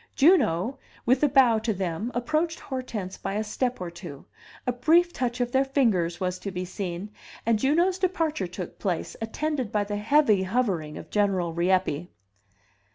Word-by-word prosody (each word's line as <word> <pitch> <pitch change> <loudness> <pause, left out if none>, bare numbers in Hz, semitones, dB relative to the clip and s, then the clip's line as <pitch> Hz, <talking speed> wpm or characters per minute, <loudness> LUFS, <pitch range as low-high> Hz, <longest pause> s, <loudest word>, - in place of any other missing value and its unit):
Juno, 270 - +3 0.3
with 255 +3 +3
a 295 - +4
bow 255 -5 +5
to 220 -1 -1
them, 185 +5 -2
approached 310 +7 0
Hortense 235 -8 -5
by 195 - -3
a 215 - 0
step 250 +4 -2
or 180 -2 -5
two, 170 -5 -10 0.4
a 250 - +2
brief 330 +8 +3
touch 245 -1 -2
of 245 -1 0
their 265 +1 +3
fingers 215 - +1
was 180 -1 -2
to 200 - -5
be 180 -1 -4
seen, 185 +1 -5 0.3
and 225 -1 +3
Juno's 345 - +2
departure 325 - 0
took 180 0 -7
place, 185 -5 -2
attended 260 +1 -2
by 210 -2 +1
the 205 0 -3
heavy 220 -2 +4
hovering 185 -7 -1
of - - -10
General 190 -5 +1
Rieppe. 175 -2 +1
220 Hz, 165 wpm, -26 LUFS, 185-265 Hz, 0.4 s, bow